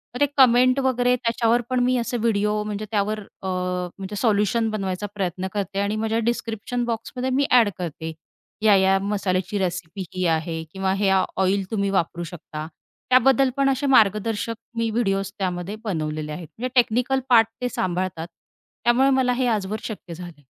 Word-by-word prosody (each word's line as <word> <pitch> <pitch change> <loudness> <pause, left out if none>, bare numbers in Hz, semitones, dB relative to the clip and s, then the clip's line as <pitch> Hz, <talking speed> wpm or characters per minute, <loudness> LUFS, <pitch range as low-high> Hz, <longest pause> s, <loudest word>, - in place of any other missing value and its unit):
तर - - -4
ते - - +7
कमेंट 255 0 +5
वगैरे 250 -2 +2
त्याच्यावर 235 -1 +1
पण 255 -1 +1
मी 255 +1 +2
असे 240 +1 -1
व्हिडिओ 210 -2 +1
म्हणजे 210 0 -4
त्यावर 215 0 0
अ, 195 -1 -10
म्हणजे 180 +2 -3
सोल्युशन 220 +1 +2
बनवायचा 195 -2 -3
प्रयत्न 190 -1 -2
करते 200 -1 -2
आणि 200 +1 0
माझ्या 220 +1 0
डिस्क्रिप्शन 235 +1 -3
बॉक्समध्ये 240 +2 -3
मी 280 - +3
ॲड 235 -4 +6
करते. 160 -2 -5 0.5
या, 215 -2 +6
या 190 0 +4
मसाल्याची 195 -1 -1
रेसिपी 180 +1 -3
ही 185 0 -1
आहे 160 0 -1
किंवा 190 0 0
ह्या 195 -2 +3 0.2
ऑइल 195 +1 +2
तुम्ही 200 -2 0
वापरू 175 -2 -1
शकता. 155 -2 -7 0.4
त्याबद्दल 260 +1 +5
पण 275 0 +3
असे 270 +1 0
मार्गदर्शक 220 -2 +2 0.2
मी 230 0 +1
व्हिडिओज 195 -4 0
त्यामध्ये 180 +1 -2
बनवलेले 155 -6 -3
आहेत. 160 +1 -7
म्हणजे 250 +3 -3
टेक्निकल 250 +2 +3
पार्ट 225 -3 +6
ते 250 - 0
सांभाळतात. 180 -5 -2 0.6
त्यामुळे 245 +4 +4
मला 260 -2 +3
हे 255 +1 0
आजवर 215 -1 -1
शक्य 200 -5 -7
झाले 175 +1 -8
आहे. 145 - -23
210 Hz, 165 wpm, -23 LUFS, 185-240 Hz, 0.6 s, ते